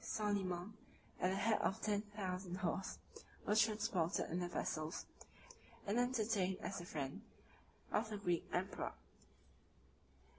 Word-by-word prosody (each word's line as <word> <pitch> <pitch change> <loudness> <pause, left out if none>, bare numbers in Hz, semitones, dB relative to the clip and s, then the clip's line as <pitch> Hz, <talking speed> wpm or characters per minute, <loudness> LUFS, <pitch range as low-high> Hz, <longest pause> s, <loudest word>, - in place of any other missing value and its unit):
Soliman, 200 -2 0 0.5
at 180 - +3
the 190 - +1
head 215 +3 +3
of 195 - +1
ten 210 -2 +2
thousand 190 -3 -3
horse, 185 +1 -1 0.5
was 210 +2 +6
transported 205 -7 +2
in 175 - +1
the 175 - 0
vessels, 155 -1 -1 0.8
and 205 +4 +2
entertained 220 -6 +2
as 195 - -3
the 175 - -6
friend, 140 -5 -3 0.7
of 220 +2 +2
the 210 - -2
Greek 175 -4 +1
emperor. 190 +2 -1
195 Hz, 125 wpm, -40 LUFS, 180-210 Hz, 0.8 s, was